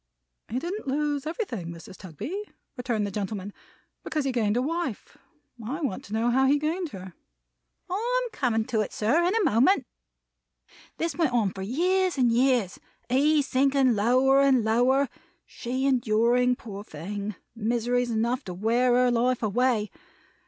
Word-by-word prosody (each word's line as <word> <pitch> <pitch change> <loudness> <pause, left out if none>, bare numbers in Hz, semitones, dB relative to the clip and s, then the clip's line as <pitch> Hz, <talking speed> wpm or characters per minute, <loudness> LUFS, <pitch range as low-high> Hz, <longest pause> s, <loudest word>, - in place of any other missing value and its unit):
"He 235 - -3
didn't 350 +6 -4
lose 290 +1 -1
everything, 285 - -4
Mrs. 170 +2 -9
Tugby," 300 - -6 0.3
returned 235 -4 -1
the 200 - -4
gentleman, 200 0 -4 0.5
"because 305 -3 -2
he 270 - +1
gained 225 -3 +1
a - - +2
wife; 325 - -4 0.4
and 225 0 -7
I 285 +6 -4
want 265 -11 -3
to 200 - -9
know 230 +2 +1
how 265 +2 +3
he 285 +2 +4
gained 320 +4 -2
her." 190 -6 -9 0.7
"I'm 485 +6 -1
coming 225 -5 0
to 225 -3 0
it, 210 - -3
sir, 255 +11 +2
in 360 +5 +1
a 450 - +2
moment. 295 - +3 1.1
This 330 -3 -2
went 320 -8 +1
on 220 -5 +2
for 190 - -8
years 360 - +1
and 245 -3 +3
years; 240 -5 +2 0.3
he 290 +4 +3
sinking 270 -1 +2
lower 255 +6 +4
and 265 -4 +4
lower; 250 +5 +3 0.4
she 255 +2 -4
enduring, 245 0 +2
poor 205 -4 -8
thing, 200 +5 -6 0.2
miseries 240 +2 0
enough 235 +4 0
to 180 - -6
wear 240 +5 +2
her 250 0 +4
life 245 +1 +1
away. 220 0 +1
250 Hz, 160 wpm, -26 LUFS, 220-280 Hz, 1.1 s, he